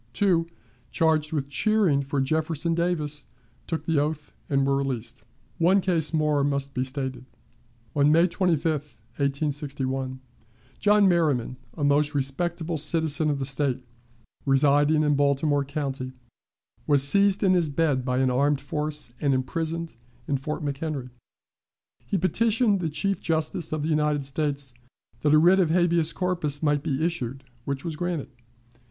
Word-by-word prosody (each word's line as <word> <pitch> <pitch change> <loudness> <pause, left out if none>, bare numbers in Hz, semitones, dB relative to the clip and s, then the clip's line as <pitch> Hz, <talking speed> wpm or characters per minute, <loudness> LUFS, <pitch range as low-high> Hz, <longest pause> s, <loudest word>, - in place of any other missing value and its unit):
Two, 170 +1 +2 0.4
charged 160 -2 +1
with 145 -4 -2
cheering 185 -1 +2
for 140 +1 -2
Jefferson 155 +3 0
Davis, 160 -4 -2 0.4
took 165 - -3
the 160 -3 +2
oath 150 0 -3 0.2
and 140 -1 +2
were 140 0 +2
released. 125 -3 -4 0.4
One 180 +4 +4
case 165 -6 0
more 150 -3 +1
most 140 -1 -1
be 130 - -1
stated. 130 -1 -4 0.7
On 145 0 +4
May 165 +3 +5
25, 175 -4 0
1861, 135 0 -4 0.6
John 210 -1 +4
Merryman, 150 -9 +1 0.2
a 150 - -4
most 145 +1 +2
respectable 160 +4 -2
citizen 155 0 +2
of 145 - 0
the 135 - -2
State, 135 -2 -1 0.6
residing 145 +2 +3
in 150 -1 +2
Baltimore 145 +1 +2
County, 135 -2 -4 0.7
was 140 -2 +6
seized 200 +4 +3
in 190 -1 +4
his 175 -4 +2
bed 145 -3 +1
by 125 0 -1
an 130 -1 +2
armed 140 +2 +2
force, 150 -1 -4
and 140 -2 +2
imprisoned 165 +5 -3 0.3
in 140 - 0
Fort 150 +3 -4
McHenry. 140 -2 -4 1.0
He 200 - 0
petitioned 215 +3 +2
the 165 -3 -2
Chief 195 +6 -2
Justice 160 +1 -1
of 155 -1 -2
the 155 - -1
United 150 -2 +1
States 140 -2 -2 0.5
that 150 - +1
a 155 - +6
writ 175 +5 +5
of 175 -4 +3
habeas 170 -1 +2
corpus 170 -5 -1
might 145 -1 +2
be 140 +2 -1
issued, 135 -6 -3 0.2
which 140 +1 -4
was 165 -2 -3
granted. 170 -4 -3
150 Hz, 145 wpm, -25 LUFS, 140-165 Hz, 1.0 s, was